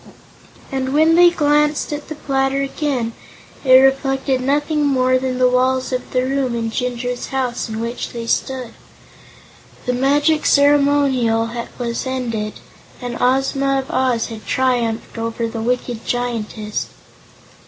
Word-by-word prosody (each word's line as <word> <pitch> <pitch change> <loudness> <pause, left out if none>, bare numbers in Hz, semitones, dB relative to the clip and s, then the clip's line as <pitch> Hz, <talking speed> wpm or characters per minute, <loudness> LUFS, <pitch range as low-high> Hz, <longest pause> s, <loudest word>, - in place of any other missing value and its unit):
And, 265 0 -2
when 315 +2 +5
they 350 +1 +7
glanced 300 -2 +1
at 295 0 -6
the 310 - -6
platter 270 -1 0
again, 270 -5 -2 0.5
it 260 -2 +4
reflected 270 0 +3
nothing 295 +3 +1
more 255 -2 +2
than 255 -1 -2
the 255 0 +4
walls 255 +1 +1
of 250 - -3
the 255 0 0
room 260 -2 -1
in 230 -1 -2
Jinjur's 245 0 -3
house 250 -3 -2
in 220 0 -4
which 235 +1 -4
they 235 -1 -6
stood. 255 0 -2 1.1
The 250 - 0
magic 290 +4 +2
ceremonial 280 -5 +3 0.3
was 235 +1 -3
ended, 230 -5 -3 0.5
and 245 -1 -5
Ozma 270 +2 +2
of 270 0 -4
Oz 250 -3 +1
had 225 -2 -9
triumphed 240 -3 0
over 230 0 -2
the 225 0 -5
wicked 245 -1 -2
Giantess. 225 -3 -3
255 Hz, 135 wpm, -19 LUFS, 240-275 Hz, 1.1 s, they